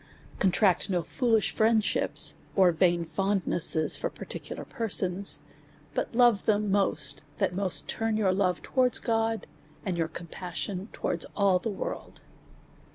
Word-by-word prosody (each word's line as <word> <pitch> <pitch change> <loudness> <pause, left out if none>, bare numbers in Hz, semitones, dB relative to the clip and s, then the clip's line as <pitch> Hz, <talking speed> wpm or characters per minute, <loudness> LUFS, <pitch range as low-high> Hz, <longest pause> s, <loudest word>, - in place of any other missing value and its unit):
Con 190 - +3
tract 185 0 +2
no 180 -3 0
foolish 225 - +1
friendships, 220 -1 +2 0.2
or 185 -3 +5
vain 170 0 +2
fondnesses 170 -3 +2
for - - -2
par - - -10
ticular - - -7
persons; 195 -3 -1 0.5
but - - -3
love 240 -4 +4
them 210 -1 +2
most, 150 -8 0
that - - 0
most 190 -1 0
turn 225 -1 -1
your 195 -4 +2
love 185 -2 0
towards 255 -1 +2
God, 225 -1 -1 0.4
and 180 -3 -2
your 165 - +1
compassion 180 +4 -6
towards - - -3
all 195 -3 +3
the 225 - -3
world. 200 - -6
195 Hz, 140 wpm, -28 LUFS, 180-220 Hz, 0.5 s, or